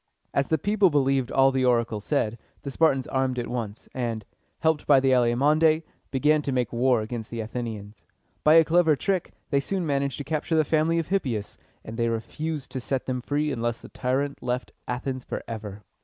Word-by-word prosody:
As 140 Hz, -, +1 dB
the 160 Hz, -, +2 dB
people 205 Hz, +4 st, +3 dB
believed 135 Hz, -4 st, +1 dB
all 135 Hz, 0 st, +5 dB
the 130 Hz, -1 st, 0 dB
oracle 115 Hz, -3 st, +1 dB
said, 115 Hz, -3 st, -1 dB, 0.2 s
the 140 Hz, -, -4 dB
Spartans 135 Hz, -3 st, +2 dB
armed 130 Hz, -1 st, -1 dB
at 120 Hz, -, -1 dB
once, 115 Hz, -3 st, -5 dB
and, 115 Hz, -4 st, -3 dB, 0.4 s
helped 160 Hz, -2 st, +1 dB
by 140 Hz, -2 st, +7 dB
the 135 Hz, 0 st, +2 dB
Alcmæonidæ, 150 Hz, +6 st, +3 dB, 0.3 s
began 150 Hz, +3 st, +3 dB
to 140 Hz, -, -2 dB
make 125 Hz, -2 st, -1 dB
war 120 Hz, -1 st, +3 dB
against 110 Hz, 0 st, -6 dB
the 115 Hz, -, -5 dB
Athenians. 110 Hz, -2 st, -6 dB, 0.4 s
By 155 Hz, +1 st, +6 dB
a 165 Hz, -1 st, +7 dB
clever 165 Hz, -1 st, +4 dB
trick, 190 Hz, +4 st, -1 dB, 0.2 s
they 140 Hz, -, +3 dB
soon 185 Hz, +5 st, -2 dB
managed 140 Hz, -3 st, 0 dB
to 145 Hz, -, -4 dB
capture 155 Hz, +3 st, -1 dB
the 155 Hz, -1 st, +3 dB
family 160 Hz, +2 st, +2 dB
of 165 Hz, -2 st, -2 dB
Hippias, 125 Hz, -, -2 dB, 0.3 s
and 110 Hz, +1 st, -7 dB
they 115 Hz, -1 st, +1 dB
refused 145 Hz, +6 st, -4 dB
to 130 Hz, -, -3 dB
set 130 Hz, +1 st, -2 dB
them 125 Hz, -1 st, -2 dB
free 145 Hz, +3 st, -1 dB
unless 120 Hz, -2 st, -1 dB
the -, -, -13 dB
tyrant 135 Hz, +2 st, -2 dB
left 125 Hz, +1 st, -2 dB, 0.2 s
Athens 130 Hz, +1 st, -3 dB
forever. 105 Hz, -2 st, -6 dB
135 Hz, 190 wpm, -26 LUFS, 120-150 Hz, 0.4 s, by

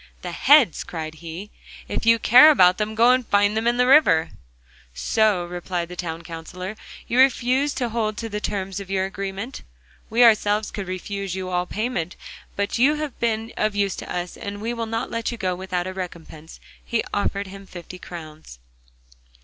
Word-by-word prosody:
'The -, -, -4 dB
heads!' 285 Hz, -, +4 dB
cried 160 Hz, -2 st, -6 dB
he, 170 Hz, +5 st, -9 dB, 0.4 s
'if -, -, -3 dB
you 230 Hz, 0 st, +7 dB
care 250 Hz, +7 st, +8 dB
about 185 Hz, -11 st, +5 dB
them, 215 Hz, +1 st, -2 dB
go 235 Hz, +3 st, +5 dB
and 255 Hz, -2 st, +1 dB
find 205 Hz, +1 st, +3 dB
them 220 Hz, +1 st, 0 dB
in 240 Hz, 0 st, +2 dB
the 250 Hz, -, +4 dB
river.' 250 Hz, -, +5 dB, 0.6 s
'So,' 200 Hz, -, +1 dB
replied 175 Hz, 0 st, -4 dB
the 180 Hz, -, -8 dB
Town 170 Hz, -1 st, -5 dB
Counsellor, 180 Hz, +4 st, -7 dB, 0.3 s
'you 245 Hz, -, +1 dB
refuse 265 Hz, +2 st, +3 dB
to 250 Hz, -2 st, -1 dB
hold 215 Hz, -2 st, -2 dB
to 230 Hz, -, -4 dB
the 210 Hz, -1 st, -4 dB
terms 195 Hz, -1 st, -3 dB
of 195 Hz, -1 st, -9 dB
your 190 Hz, -1 st, 0 dB
agreement? 195 Hz, +5 st, -5 dB, 0.5 s
We 235 Hz, +3 st, +4 dB
ourselves 215 Hz, -2 st, +3 dB
could 200 Hz, -3 st, -5 dB
refuse 190 Hz, +1 st, -4 dB
you 185 Hz, -1 st, -4 dB
all 180 Hz, 0 st, 0 dB
payment. 215 Hz, -6 st, -3 dB, 0.4 s
But 200 Hz, +3 st, -2 dB
you 285 Hz, +5 st, +4 dB
have 300 Hz, -3 st, -5 dB
been 225 Hz, 0 st, -1 dB
of 215 Hz, -1 st, 0 dB
use 200 Hz, -1 st, 0 dB
to -, -, -7 dB
us, 175 Hz, 0 st, -4 dB
and 200 Hz, 0 st, -6 dB
we 230 Hz, +3 st, -3 dB
will 230 Hz, -1 st, -4 dB
not 225 Hz, +2 st, -3 dB
let 230 Hz, +1 st, -2 dB
you 235 Hz, -, -6 dB
go 185 Hz, -4 st, -1 dB
without 180 Hz, -1 st, -3 dB
a 185 Hz, -, -5 dB
recompense,' 165 Hz, -4 st, -8 dB, 0.2 s
and -, -, -33 dB
he 235 Hz, -, -1 dB
offered 200 Hz, 0 st, -1 dB
him 195 Hz, 0 st, -11 dB
fifty 180 Hz, 0 st, -10 dB
crowns. 155 Hz, -, -10 dB
200 Hz, 190 wpm, -23 LUFS, 180-230 Hz, 0.6 s, care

